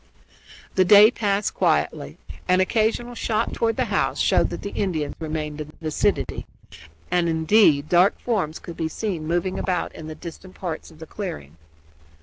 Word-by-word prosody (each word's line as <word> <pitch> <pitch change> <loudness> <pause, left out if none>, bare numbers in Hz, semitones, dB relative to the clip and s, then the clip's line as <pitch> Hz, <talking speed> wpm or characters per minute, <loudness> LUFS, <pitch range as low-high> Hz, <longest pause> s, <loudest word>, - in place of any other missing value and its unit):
The 185 - +4
day 210 +4 +8
passed 205 -3 -1
quietly. - - 0 0.3
An 185 0 +4
occasional 225 +4 +1
shot 225 -2 -1
toward 225 -1 0
the - - 0
house - - 0
showed - - +3
that - - -7
the 200 - -4
Indians 160 -7 -2
remained 155 -1 -4
in 150 - -6
the 155 - -16
vicinity 155 -2 -1 0.6
and, 175 -1 +2
indeed, 160 -2 +4
dark 180 +4 +4
forms 190 -10 -1
could 170 - -9
be 160 - -1
seen 165 -2 -4
moving 175 +3 -1
about 180 -2 -2
in 155 - -9
the 155 - -7
distant 180 +3 -10
parts 170 -4 -5
of 160 - -17
the 160 - -9
clearing. 80 - -7
175 Hz, 165 wpm, -23 LUFS, 155-205 Hz, 0.6 s, day